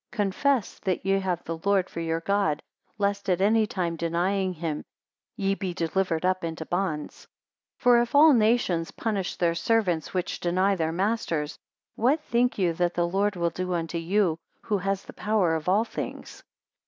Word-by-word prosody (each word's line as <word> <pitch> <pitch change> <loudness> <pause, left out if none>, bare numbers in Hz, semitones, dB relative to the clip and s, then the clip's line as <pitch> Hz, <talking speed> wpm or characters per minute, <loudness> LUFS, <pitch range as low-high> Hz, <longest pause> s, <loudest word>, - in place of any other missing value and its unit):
Confess 220 +3 0
that 190 -2 -2
ye 195 0 +3
have 180 -3 -2
the 165 0 -5
Lord 200 -2 +2
for - - -7
your 165 0 -1
God, 200 -5 0 0.3
lest 200 0 -1
at 180 -1 +2
any 215 +2 +3
time 175 -4 -2
denying 180 +4 0
him, 160 -3 -4 0.5
ye 195 -1 0
be 190 -3 -4
delivered 170 0 0
up 185 -1 +1
into 160 -1 -4
bonds. 175 -4 -3 0.5
242 - - -23
For 245 -1 +6
if 240 +4 -3
all 305 +1 +8
nations 215 -8 +2
punish 205 -5 -2
their 170 -1 +1
servants 180 -3 0
which 180 -1 -2
deny 185 +3 +2
their 160 -3 -1
masters; 170 -5 -1 0.4
what 265 +7 +2
think 245 -2 +1
you 180 -4 +2
that 175 +1 0
the 175 0 +1
Lord 200 +3 0
will 170 -1 0
do 180 +2 -3
unto 165 0 -2
you, 170 -1 +1 0.2
who 205 -2 0
has 195 +1 -1
the - - -11
power 205 -6 +1
of 160 +2 -2
all 210 +5 +3
things? - - -7
185 Hz, 180 wpm, -26 LUFS, 170-205 Hz, 0.5 s, all